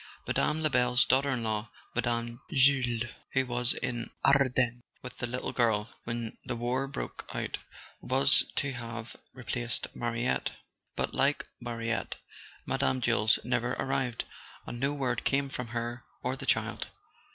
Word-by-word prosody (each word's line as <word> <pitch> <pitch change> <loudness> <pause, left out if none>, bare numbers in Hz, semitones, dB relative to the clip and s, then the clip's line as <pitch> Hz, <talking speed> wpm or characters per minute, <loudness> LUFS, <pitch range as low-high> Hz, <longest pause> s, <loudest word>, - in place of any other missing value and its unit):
Mme. 155 +1 +1
Lebel's 125 -4 +4
daughter 135 +2 +3
in 125 -4 0
law, 110 0 -1 0.2
Mme. 120 0 -1
Jules, 130 -5 +4 0.3
who 135 0 +3
was 120 0 +3
in 120 -1 -2
the - - -15 0.2
Ardennes 125 -3 +4 0.2
with 125 -1 -8
the 120 - -1
little 125 +2 -3
girl 110 -3 +2
when 115 -1 -4
the - - -3
war 125 +3 0
broke 135 - -6
out, - - -2 0.4
was - - +5
to 140 -1 0
have 115 -2 -6 0.2
replaced 120 -2 -1
Mariette. 120 +1 0 0.4
But, - - -1
like - - +2
Mariette, 115 -1 -2 0.5
Mme. 135 -1 +1
Jules 115 -3 +4
never 125 0 0
arrived, 130 -3 -1 0.4
and 120 - -6
no 140 +3 +2
word 130 -5 -1
came 140 0 +2
from 125 -3 -4
her 120 +1 -3 0.2
or 125 +1 0
the - - -7
child. - - +1
120 Hz, 145 wpm, -30 LUFS, 115-130 Hz, 0.5 s, was